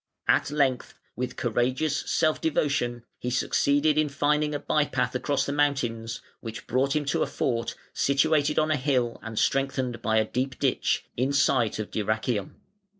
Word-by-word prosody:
At - - +3
length, 140 -4 0 0.2
with 125 +1 -3
courageous 130 +6 0
self 155 -1 +2
devotion, 140 -6 0 0.2
he 125 - -3
succeeded 145 +4 +2
in 155 -1 +2
finding 150 +1 +1
a - - -2
by 150 - +1
path 125 -3 -1
across 140 +2 0
the 140 - -2
mountains, 120 -6 -1 0.2
which 115 -1 -7
brought 135 +3 +1
him 150 -1 0
to 140 - 0
a - - +2
fort, 115 -2 -2 0.2
situated 150 +1 +2
on 155 0 +2
a 155 - +2
hill 130 -4 0
and 115 -1 -7
strengthened 130 -2 0
by 110 -1 +1
a 110 - +3
deep 130 +4 -2
ditch, - - 0
in 130 +3 0
sight 130 -5 +2
of 110 -1 -5
Dyrrhachium. 110 -1 -1
135 Hz, 165 wpm, -26 LUFS, 120-145 Hz, 0.2 s, At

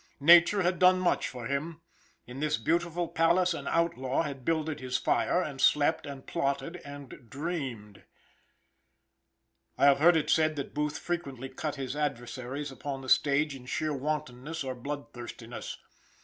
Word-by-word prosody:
Nature 175 +6 +7
had 180 0 +1
done 185 0 +6
much 185 -1 +1
for 125 -2 -7
him. 150 +5 -3 0.5
In 125 +2 -9
this 155 0 +1
beautiful 170 +7 0
palace 170 +3 +3
an - - -6
outlaw 165 -5 +1
had 140 -4 -6
builded 155 -1 -1
his 130 0 -1
fire, 180 +6 +1
and 140 -4 -5
slept, 150 +2 +3
and 140 -2 -8
plotted, 140 +1 -2
and 140 -6 -11
dreamed. 135 - -5 1.8
I - - +4
have 140 -1 +6
heard 170 +2 +6
it 155 - 0
said 155 -1 +3
that 140 -2 -5
Booth 150 +1 -1
frequently 140 -7 -4
cut 150 +3 -4
his 135 -1 -4
adversaries 135 0 -3
upon 135 +1 -5
the 130 - -7
stage 145 +1 +3
in 125 -2 -12
sheer 155 +4 -1
wantonness 145 +1 -3
or 130 -1 -3
bloodthirstiness. 120 -3 -7
145 Hz, 150 wpm, -29 LUFS, 130-165 Hz, 1.8 s, Nature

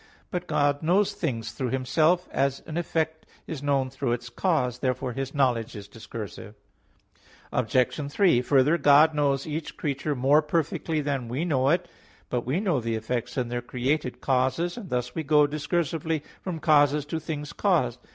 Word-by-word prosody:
But 180 -1 -3
God 145 -2 +1
knows 185 +5 +2
things 115 -9 -3
through 125 +2 -3
Himself; 155 +8 +2
as 135 0 0
an 155 - -7
effect 160 -2 -2 0.2
(is 150 -4 -6
known) 140 -2 +1
through 130 -2 -1
its 120 0 -5
cause. 125 -3 0
Therefore 130 -1 -1
His 135 +3 -4
knowledge 120 -6 +1
is 100 -1 -8
discursive. 110 -2 -8 1.0
Obj. 130 +4 0
3: 170 -7 +4
Further, 140 +5 +3
God 150 +2 +6
knows 140 -2 +1
each 155 +1 -5
creature 145 0 -2
more 140 +4 +4
perfectly 155 0 -1
than 140 -4 -2
we 130 +8 -2
know 135 -5 +2
it. 170 +4 +1 0.4
But 125 -1 -2
we 140 +8 +1
know 185 -9 +1
the 115 -1 -2
effects 120 +3 -3
in 125 -2 -1
their 120 0 -2
created 125 +3 -2
causes; 135 +7 +1
and 225 -7 -8
thus 125 0 -2
we 160 - -2
go 150 -1 +4
discursively 160 +1 -1 0.2
from 180 -3 -4
causes 150 -2 +3
to 160 +2 -3
things 150 0 -5
caused. 130 - +1
145 Hz, 170 wpm, -26 LUFS, 125-160 Hz, 1.0 s, God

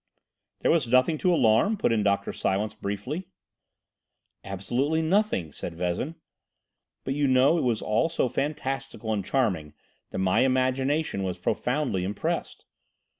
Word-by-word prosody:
"There - - +3
was 160 -7 +2
nothing 130 +6 +3
to 180 - +2
alarm?" 140 - +3
put 120 - +1
in 110 -2 +2
Dr. 100 -1 0
Silence 105 +3 -1
briefly. 110 - -4 1.2
"Absolutely 125 +12 -1
nothing," 170 - +1
said 85 +4 -7
Vezin; 90 - -2 0.9
"but 135 - -2
you 145 0 +1
know 130 +6 +4
it - - -1
was 120 -4 0
all 110 +10 +1
so 165 - 0
fantastical 135 -5 -3
and 100 -2 -1
charming 90 - -1 0.3
that - - -6
my 95 -1 +2
imagination 130 0 +1
was 90 -2 -2
profoundly 125 +2 -1
impressed. 100 +3 -3
125 Hz, 135 wpm, -26 LUFS, 100-145 Hz, 1.2 s, know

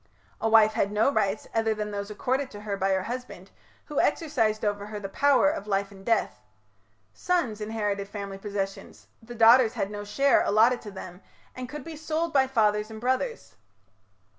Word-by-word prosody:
A 225 - +1
wife 220 -1 +6
had 200 -1 0
no 215 +6 +2
rights 200 -5 -1
other 225 -1 +1
than 210 0 -4
those 200 0 -4
accorded 260 +5 -1
to 205 - -10
her 210 -1 -3
by 195 0 0
her 190 -1 +1
husband, 240 -6 -7 0.3
who 295 - -3
exercised 230 -9 +1
over 205 0 -2
her 210 -1 -6
the 200 - -5
power 280 +6 +3
of 205 -8 -6
life 200 0 -1
and 195 -1 -14
death. 230 +2 0 0.7
Sons 255 -13 -1
inherited 205 -2 -2
family 200 -1 -6
possessions; 195 -1 -5 0.2
the 240 +2 -10
daughters 230 +1 +6
had 195 - -3
no 205 0 -5
share 275 +7 +3
allotted 230 +4 +3
to 210 - -8
them, 185 -1 -9 0.3
and 255 0 -6
could 295 0 -7
be 325 +2 -8
sold 315 +2 -2
by 265 -2 +4
fathers 210 -4 +1
and 220 0 -8
brothers. 260 - -2
215 Hz, 185 wpm, -27 LUFS, 205-255 Hz, 0.7 s, wife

